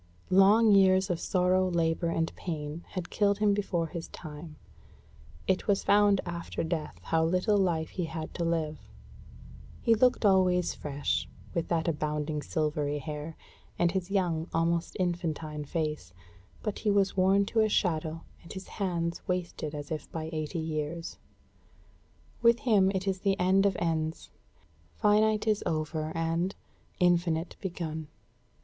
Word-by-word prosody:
Long 205 +4 +6
years 190 -1 +5
of 170 - -1
sorrow, 185 0 +2
labor, 165 0 +1
and 165 0 -1
pain 155 -1 -5
had 180 -3 -6
killed 200 -1 +2
him 210 -1 +3
before 195 -4 -1
his 165 +1 -6
time. 155 0 -9 0.9
It 190 +3 0
was 200 -2 +2
found 205 -1 +4
after 170 -1 -4
death 160 -2 -3
how 160 0 +1
little 185 +6 +2
life 165 -4 +1
he 180 - -3
had 160 -1 -6
to 170 - -3
live. 160 -2 -1 1.0
He 230 - +3
looked 245 0 +3
always 185 -2 +3
fresh, 145 -1 -2 0.2
with 170 - -1
that 165 -1 0
abounding 150 -1 -1
silvery 150 -2 -1
hair, 150 +2 -6 0.4
and 175 -1 +2
his 190 0 -2
young, 175 -5 0
almost 170 +1 0
infantine 160 -4 -2
face, 150 - -3 0.5
but 210 -2 -3
he 215 - 0
was 200 -1 +2
worn 195 +1 +4
to 225 - 0
a 215 0 +4
shadow, 165 -5 0 0.2
and 170 - -13
his 190 0 -8
hands 170 -4 -2
wasted 175 -4 -3
as 145 +1 -7
if 155 - -5
by 160 -1 -4
eighty 155 +2 -3
years. 160 +1 -4 1.2
With 235 0 +5
him 205 -6 +4
it 190 +1 -2
is 190 -1 0
the 195 0 0
end 190 +2 +4
of 195 - -1
Ends; 160 -1 -2 0.6
finite 215 +1 +3
is 215 -2 +2
over 155 0 -2
and, 165 +3 0 0.4
infinite 175 -2 +2
begun. 160 -4 -4
170 Hz, 145 wpm, -29 LUFS, 160-190 Hz, 1.2 s, Long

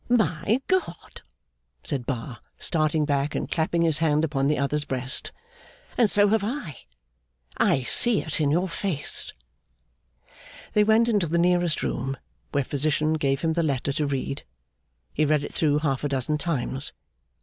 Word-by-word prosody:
'My 215 -2 +2
God!' 375 -1 -2 0.6
said 135 -6 -3
Bar, 120 -2 -4 0.2
starting 155 -2 +1
back, 145 0 0
and - - -2
clapping 165 +1 0
his 160 -3 +2
hand 155 -1 +2
upon 140 -3 0
the 150 - +1
other's 145 +2 0
breast. 130 -2 -2 0.6
'And 235 -4 +4
so 205 0 +5
have 220 -1 +2
I! 210 - -4 0.8
I 135 - +2
see 235 - +3
it 155 0 -2
in 145 - +2
your 175 +6 +1
face.' 170 -4 -2 1.4
They 210 - +5
went 220 +2 +4
into 205 -7 +2
the 170 +2 0
nearest 175 -1 +2
room, 135 +2 -2 0.3
where 140 -1 +1
Physician 150 +3 0
gave 140 -3 0
him 160 -1 +1
the 170 - +1
letter 140 -3 -1
to 150 +1 -1
read. 135 0 -3 0.7
He 155 - +1
read 150 -1 +2
it - - -7
through 150 -2 +2
half 145 -3 -1
a 145 - 0
dozen 140 +3 -1
times. 140 -3 -1
155 Hz, 160 wpm, -25 LUFS, 140-175 Hz, 1.4 s, so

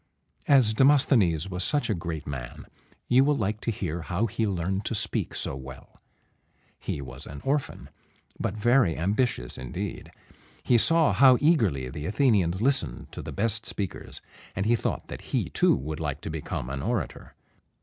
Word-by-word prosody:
As 130 -6 +5
Demosthenes 115 - +3
was 90 -1 -2
such 145 +6 +1
a 110 - +1
great 85 -4 -5
man, 65 -4 -7 0.4
you 130 +2 +5
will 145 0 +2
like 105 -2 -2
to - - -2
hear 85 -6 -3
how 95 +6 -1
he 115 0 -1
learned 95 +1 -2
to 115 - -1
speak 110 +1 -1
so - - -2
well. 65 -1 -11 0.8
He 70 - -4
was 65 +3 -9
an 70 0 -8
orphan, 140 +1 -2 0.5
but - - -2
very 120 - +3
ambitious 100 - -1
indeed. 65 -1 -6 0.5
He 120 - +4
saw 165 +4 +4
how 130 -2 +6
eagerly 110 - +2
the 75 +4 -6
Athenians 100 -5 +2
listened 130 - 0
to - - -7
the - - -7
best 110 +2 0
speakers, 100 -3 -5 0.3
and 95 - -1
he 120 +2 +4
thought - - -3
that - - -8 0.2
he - - -2
too - - +4
would 75 +4 -5
like 75 -3 -3
to - - -5
become 75 -5 -4
an 70 0 -4
orator. 110 - -3
100 Hz, 170 wpm, -26 LUFS, 80-120 Hz, 0.8 s, how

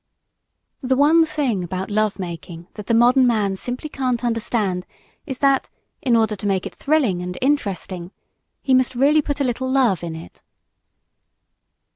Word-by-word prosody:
The 260 -1 +1
one 315 +4 +5
thing 255 -12 -1
about 185 +3 -4
love 215 0 +1
making 170 -2 -7
that 210 -2 -9
the - - +1
modern 250 +2 +5
man 210 -5 +1
simply 245 +8 -4
can't 255 -4 -2
understand 215 -5 -1 0.4
is 265 -3 -4
that, 275 -1 +2 0.3
in 245 -3 +2
order 220 -2 +2
to 205 - -4
make 190 -2 0
it - - -6
thrilling 275 - +1
and 180 0 -5
interesting, 195 -10 -1 0.5
he 265 - +2
must 255 0 +3
really 290 +5 +4
put 290 0 -3
a - - +2
little 260 0 -2
love 250 -10 +2
in 165 -2 -4
it. 160 - -11
235 Hz, 160 wpm, -21 LUFS, 190-265 Hz, 0.5 s, one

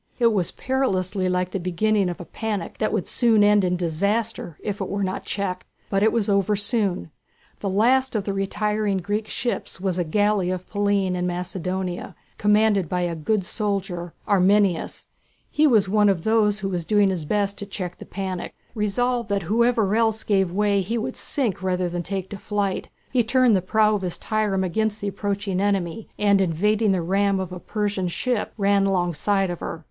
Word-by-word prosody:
It 235 -2 +3
was 185 -5 +1
perilously 195 -8 -1
like 180 0 0
the 195 - -2
beginning 190 +3 +1
of 175 - -5
a 175 - -7
panic 210 -4 -4
that 215 - +1
would 215 -4 -1
soon 225 -4 +3
end 205 -1 +5
in 180 -1 +1
disaster 185 +1 -1
if 205 -1 -3
it 190 - -3
were 200 0 -1
not 185 0 -3
checked. 185 -2 -3 0.2
But 195 -1 +2
it 220 +1 +4
was 230 -3 +1
soon 205 +2 +2
over. 85 - -10 0.5
The 200 - -2
last 250 +6 +2
of 210 - 0
the 200 - -2
retiring 205 +1 0
Greek 205 +4 -2
ships 240 -5 -3
was 185 -1 -1
a - - +2
galley 205 +2 +1
of 185 0 -4
Pallene 200 -2 +1
in 180 0 -1
Macedonia, 180 +1 -4 0.2
commanded 210 -4 +3
by 180 0 0
a 175 -1 -1
good 190 +5 0
soldier, 190 -5 -3
Arminias. 195 -2 +2 0.5
He 305 +1 +4
was 220 -8 +4
one 210 +1 +4
of 180 -4 0
those 215 -2 +2
who 195 - -2
was 175 -3 -2
doing 205 +1 +3
his 175 -4 -3
best 200 +5 -1
to 200 - -6
check 180 -3 -6
the - - -9
panic. 185 -2 -5 0.2
Resolved 235 +2 0
that 200 -2 0
whoever 220 +1 +2
else 220 -1 +1
gave 195 -4 +1
way 200 +1 +2
he 220 +6 -2
would 220 - -3
sink 235 -11 0
rather 185 -1 0
than 175 0 -3
take 190 +1 -4
to 200 - -5
flight, 205 -2 -2 0.2
he 245 -2 +3
turned 245 -1 +4
the 185 - +2
prow 215 +3 +3
of 205 - -1
his 180 -2 -3
trireme 210 -3 0
against 215 +4 -1
the 200 - -2
approaching 200 -1 -2
enemy, 200 0 -1
and 200 -1 +3
evading 205 +5 +2
the 185 -3 0
ram 195 +2 +1
of 185 -1 -4
a 180 - -6
Persian 205 -2 -2
ship 235 +6 -1
ran 200 -1 +3
alongside 190 +1 +1
of 175 - -5
her. 165 - -5
200 Hz, 195 wpm, -23 LUFS, 185-215 Hz, 0.5 s, end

